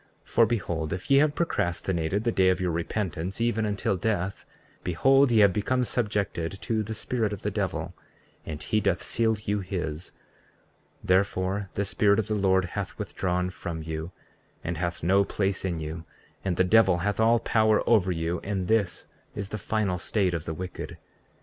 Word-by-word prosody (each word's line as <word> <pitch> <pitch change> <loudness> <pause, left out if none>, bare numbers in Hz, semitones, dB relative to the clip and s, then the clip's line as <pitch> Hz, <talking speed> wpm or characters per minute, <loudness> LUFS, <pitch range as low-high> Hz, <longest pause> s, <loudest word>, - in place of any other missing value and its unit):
34:35 - - -22
For 115 - +5
behold, 85 -9 -2
if 90 - -5
ye 135 - +7
have 145 +1 +4
procrastinated 90 - -1
the 115 - +1
day 95 -3 +4
of 90 - +2
your 90 -2 0
repentance 85 +1 -3
even 115 -2 +1
until 100 -2 0
death, 100 -1 -2 0.4
behold, 135 +10 +4
ye 115 -2 +5
have 100 -2 +6
become 125 +5 +1
subjected 100 -7 -1
to 110 -1 0
the 110 +1 -4
spirit 115 -1 -1
of 105 - -6
the 105 - -1
devil, 100 -3 -2 0.5
and 75 -1 -6
he 110 - +1
doth - - 0
seal 110 -1 +1
you 105 0 0
his; 90 -4 -4 0.9
therefore, 95 +1 +1
the 100 - 0
Spirit 100 0 +3
of 110 - 0
the 110 - -1
Lord 95 -2 +3
hath 95 +1 -5
withdrawn 90 0 -1
from 80 -3 -5
you, 80 +2 -5 0.5
and 85 0 -3
hath 85 0 -3
no 95 +4 +4
place 100 -1 -1
in 90 -3 -1
you, 80 +1 -5 0.4
and 90 -3 -1
the 95 - +5
devil 95 -1 +5
hath 105 +1 0
all 115 +1 +5
power 110 -2 +2
over 100 -6 +4
you; 85 0 -1
and 95 -3 -2
this 110 -4 +1 0.3
is 100 -1 -4
the 105 - -4
final 100 -3 -1
state 95 -3 0
of 85 -1 -3
the 80 - -3
wicked. 90 +2 -6
95 Hz, 180 wpm, -27 LUFS, 90-110 Hz, 0.9 s, ye